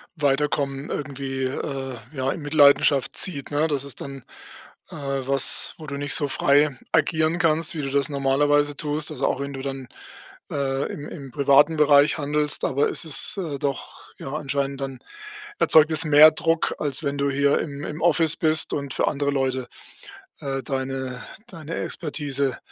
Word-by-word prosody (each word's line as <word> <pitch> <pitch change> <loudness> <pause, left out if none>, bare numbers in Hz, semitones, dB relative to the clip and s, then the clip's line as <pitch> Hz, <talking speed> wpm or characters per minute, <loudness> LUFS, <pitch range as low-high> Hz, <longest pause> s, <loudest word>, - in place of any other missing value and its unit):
Weiterkommen 140 -1 -1
irgendwie, 135 -2 -5
äh, 135 -1 -5 0.2
ja 135 -1 -2
in 170 - -6
Mitleidenschaft 145 -2 +3
zieht, 145 -7 0
ne? 150 +2 +1
Das 140 -3 -2
ist 140 - -7
dann, 135 -2 -8 0.7
äh, - - -9
was, 135 -2 +2
wo 155 -2 -11
du 140 - -5
nicht 145 0 +2
so 145 - +3
frei 140 -1 +2
agieren 160 +1 +1
kannst, 165 0 +1
wie 155 - -3
du 135 - -3
das 140 0 0
normalerweise 145 +1 +1
tust. 150 +1 -2
Also, - - -2
auch - - -2
wenn 140 0 -5
du 135 - -7
dann, 135 -2 -6 0.6
äh, 135 -1 -2
im 145 - -8
im 140 -5 -10
privaten 145 +4 +3
Bereich 145 +1 +4
handelst, 150 0 -1
aber 140 +2 +1
es - - -2
ist, 155 +6 +2
äh, 155 -7 -4
doch, 140 -2 -5
ja, 135 - -7
anscheinend 140 -2 -3
dann 135 -2 -6 0.6
erzeugt 155 0 +5
es 155 0 +4
mehr 155 +1 +7
Druck, 165 +1 0
als 145 +1 0
wenn 140 0 -2
du 140 0 0
hier 140 +1 +2
im 145 -2 -6
im 155 +1 -6
Office 165 -2 +3
bist 160 -1 +2
und 140 -2 -4
für - - +1
andere 145 -1 -1
Leute, 130 -2 -2 0.7
äh, 135 -1 -4
deine 130 -2 -4 0.3
deine 165 -4 -8
Expertise, 140 -4 -2
140 Hz, 170 wpm, -23 LUFS, 135-150 Hz, 0.7 s, mehr